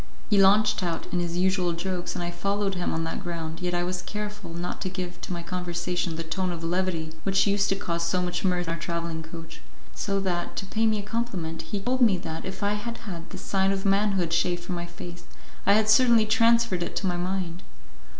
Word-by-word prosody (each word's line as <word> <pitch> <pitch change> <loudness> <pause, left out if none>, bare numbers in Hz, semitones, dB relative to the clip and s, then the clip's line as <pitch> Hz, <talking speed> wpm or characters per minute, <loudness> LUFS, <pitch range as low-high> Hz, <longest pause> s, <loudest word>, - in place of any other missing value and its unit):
He 200 -1 +6
launched 205 +2 +5
out 170 -2 -2
in 180 - +2
his 170 0 -1
usual 185 -1 +2
jokes, 180 +1 -3
and 175 - -2
I 175 - -2
followed 200 +2 0
him 180 -1 -1
on 165 - -1
that 165 - -3
ground, 165 -2 -4
yet 180 -1 -1
I 175 - +1
was 180 0 -2
careful 210 -3 -5
not 175 +1 -4
to 185 - -1
give 180 -1 -5
to - - -6
my 170 -1 -3
conversation 175 -1 -2
the 165 - -3
tone 185 +3 -1
of 165 -1 -5
levity 170 -2 -1
which 195 0 +3
used 200 0 +2
to 195 - +3
cause 170 -3 -2
so 170 +2 +1
much 180 -1 -1
mirth 180 -2 +2
in 165 - 0
our 165 - -5
travelling 170 -1 -3
coach; 165 0 -9 0.3
so 200 -1 -1
that, 175 -2 -2
to, - - -3
pay 220 +3 +1
me 215 -1 +2
a 205 - -3
compliment, 200 -7 -3
he 200 +5 -4
told 250 +6 0
me 215 -6 +6
that, 160 -2 -5
if 190 +1 -5
I 205 +1 +2
had 230 +3 -4
had 170 -5 -6
the - - -7
sign 195 0 +1
of 195 0 -2
manhood 195 -4 +2
shaved 175 0 +1
from 180 - -4
my 175 0 -3
face, 175 0 -9 0.5
I 200 - +7
had 215 +1 +4
certainly 235 0 +6
transferred 230 -3 +4
it - - -3
to - - -1
my 180 -1 +1
mind. 180 -1 -2
180 Hz, 230 wpm, -27 LUFS, 170-200 Hz, 0.5 s, I